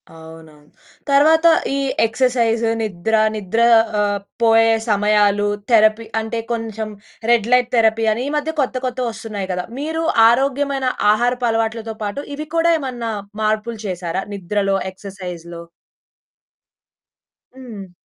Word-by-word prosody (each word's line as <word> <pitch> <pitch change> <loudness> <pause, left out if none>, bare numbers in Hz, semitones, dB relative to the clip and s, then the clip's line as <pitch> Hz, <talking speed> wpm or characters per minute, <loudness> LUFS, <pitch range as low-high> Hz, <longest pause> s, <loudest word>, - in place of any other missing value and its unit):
అవునవును. 160 -2 -14 0.4
తర్వాత 315 +4 +5 0.3
ఈ - - -1 0.3
ఎక్సర్‌సైజ్, 235 -1 +1 0.2
నిద్ర, 215 +1 -1 0.2
నిద్ర 210 +2 -2 0.4
ఆహ్, 205 -1 0 0.2
పోయే 225 0 +5 0.2
సమయాలు, 205 0 +2 0.2
థెరపీ 215 0 +4 0.2
అంటే 225 +1 -4
కొంచెం 225 -2 -3 0.4
రెడ్ 230 -2 +3
లైట్ 250 -1 +3
థెరపీ 225 -1 +3
అని 230 - -4
ఈ - - -2
మధ్య 300 +2 -2
కొత్త 260 -1 -2
కొత్తవొస్తున్నాయి 225 -5 -4
కదా! 180 0 -3
మీరు 320 +3 -3 0.3
ఆరోగ్యమైన 275 +2 0 0.3
ఆహారపు 245 +3 +1
అలవాట్లతో 225 0 -2
పాటు 210 +8 -4
ఇవి 305 +1 -6
కూడా 335 +1 +3
ఏమన్నా 245 -5 -4 0.3
మార్పులు 215 +2 -1
చేశారా? 180 -1 -3
నిద్రలో, 195 +1 -1
ఎక్సర్‌సైజ్‌లో 180 -3 -9 2.0
హ్మ్. 215 -8 -10
225 Hz, 115 wpm, -19 LUFS, 200-245 Hz, 2.0 s, తర్వాత